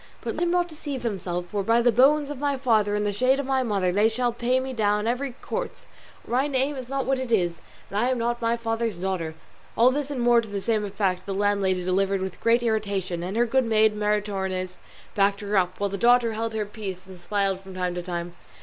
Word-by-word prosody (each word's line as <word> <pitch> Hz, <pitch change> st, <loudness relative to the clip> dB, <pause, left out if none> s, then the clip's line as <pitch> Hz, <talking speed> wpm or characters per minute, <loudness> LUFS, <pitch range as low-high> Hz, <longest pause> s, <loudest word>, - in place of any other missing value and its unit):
But -, -, -3 dB
let -, -, -5 dB
him 345 Hz, -, +2 dB
not 350 Hz, 0 st, +2 dB
deceive 290 Hz, -5 st, -6 dB
himself, 180 Hz, -5 st, -3 dB
for, 205 Hz, -, -1 dB
by 230 Hz, +4 st, +3 dB
the 240 Hz, 0 st, +4 dB
bones 285 Hz, +5 st, +4 dB
of 285 Hz, -, -6 dB
my 285 Hz, -1 st, 0 dB
father 220 Hz, -5 st, +2 dB
and 210 Hz, 0 st, 0 dB
the 205 Hz, -, 0 dB
shade 255 Hz, +6 st, +2 dB
of 280 Hz, -, -2 dB
my 265 Hz, 0 st, +1 dB
mother, 200 Hz, -7 st, 0 dB
they 205 Hz, +4 st, +3 dB
shall 240 Hz, +1 st, 0 dB
pay 245 Hz, +2 st, +1 dB
me 260 Hz, 0 st, -4 dB
down 210 Hz, -2 st, +1 dB
every 250 Hz, +3 st, -1 dB
quarto; -, -, -4 dB, 0.4 s
or -, -, -11 dB
my 260 Hz, +4 st, +2 dB
name 275 Hz, +1 st, 0 dB
is 255 Hz, -2 st, -7 dB
not 275 Hz, -1 st, -1 dB
what 270 Hz, 0 st, +1 dB
it 260 Hz, -2 st, -4 dB
is, 175 Hz, -6 st, +1 dB, 0.3 s
and 200 Hz, -, 0 dB
I 240 Hz, +3 st, +2 dB
am 260 Hz, -, +1 dB
not 235 Hz, +1 st, -1 dB
my 230 Hz, 0 st, +1 dB
father's 225 Hz, -3 st, -2 dB
daughter." 175 Hz, -3 st, -3 dB, 0.4 s
All 245 Hz, +3 st, +6 dB
this 285 Hz, +1 st, -2 dB
and 280 Hz, -3 st, -3 dB
more 240 Hz, 0 st, +4 dB
to 220 Hz, -, -10 dB
the 200 Hz, -1 st, -3 dB
same 215 Hz, +1 st, 0 dB
effect 195 Hz, -2 st, -1 dB
the 195 Hz, -, -2 dB
landlady 195 Hz, -2 st, +1 dB
delivered 195 Hz, +1 st, +1 dB
with 190 Hz, -1 st, -5 dB
great 235 Hz, +1 st, +3 dB
irritation, 200 Hz, -6 st, -1 dB
and 185 Hz, +5 st, -4 dB
her 240 Hz, -, +4 dB
good 260 Hz, +3 st, +2 dB
maid 220 Hz, -1 st, +3 dB
Maritornes 195 Hz, -3 st, -2 dB, 0.3 s
backed 200 Hz, +1 st, +2 dB
her 205 Hz, 0 st, -2 dB
up, 185 Hz, -1 st, +1 dB
while 200 Hz, -1 st, -1 dB
the 200 Hz, -, -4 dB
daughter 240 Hz, -1 st, +4 dB
held 225 Hz, 0 st, -3 dB
her 215 Hz, -1 st, -1 dB
peace 200 Hz, -3 st, -7 dB
and 185 Hz, -2 st, -13 dB
smiled 195 Hz, -2 st, 0 dB
from 190 Hz, -1 st, -11 dB
time 180 Hz, -1 st, -1 dB
to 175 Hz, -, -3 dB
time. 175 Hz, -1 st, -5 dB
215 Hz, 240 wpm, -25 LUFS, 195-245 Hz, 0.4 s, All